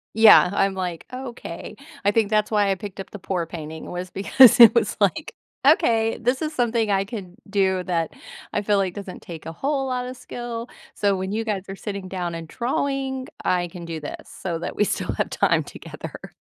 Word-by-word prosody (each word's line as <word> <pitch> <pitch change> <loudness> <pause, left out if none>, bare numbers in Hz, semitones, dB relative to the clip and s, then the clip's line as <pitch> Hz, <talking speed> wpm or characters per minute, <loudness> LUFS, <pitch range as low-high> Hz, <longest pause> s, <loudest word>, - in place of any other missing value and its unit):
Yeah, 220 -4 +8
I'm 195 -1 +1
like, 180 -3 -4
"Okay." 255 -1 -7 0.3
I 200 - +5
think 215 0 +2
that's 215 -1 +2
why 205 -2 +3
I - - +3
picked 200 0 -8
up 195 - -8
the 205 - -8
pour 180 -2 -2
painting 160 -1 -7
was 180 +1 -5
because 240 +6 +6
it 230 -1 +11
was 220 -5 +1
like, 205 - +1 0.3
"Okay, 230 - +4
this 250 +4 0
is 310 0 -2
something 235 -4 +1
I 195 -1 +2
can 195 -5 -7
do 190 -2 +1
that 165 -3 -1 0.4
I - - 0
feel 205 0 +2
like 195 -2 +1
doesn't 200 -3 -7
take 165 -2 -9
a 165 - -5
whole 270 - -1
lotta 250 -1 -2
skill, 240 -1 -6 0.3
so 200 -1 +1
when 190 +1 -3
you 225 +2 -1
guys 210 -4 -2
are 195 - -6
sitting 200 -2 -6
down 180 -2 -3
and 165 -1 -6
drawing, 265 - -2 0.2
I 175 -1 +1
can 175 -1 -9
do 165 -1 -5
this 150 - -8
so 170 -3 -4
that 170 - -5
we 210 - +3
still - - -2
have - - -1
time - - +2
together." - - -10
200 Hz, 205 wpm, -23 LUFS, 185-235 Hz, 0.4 s, it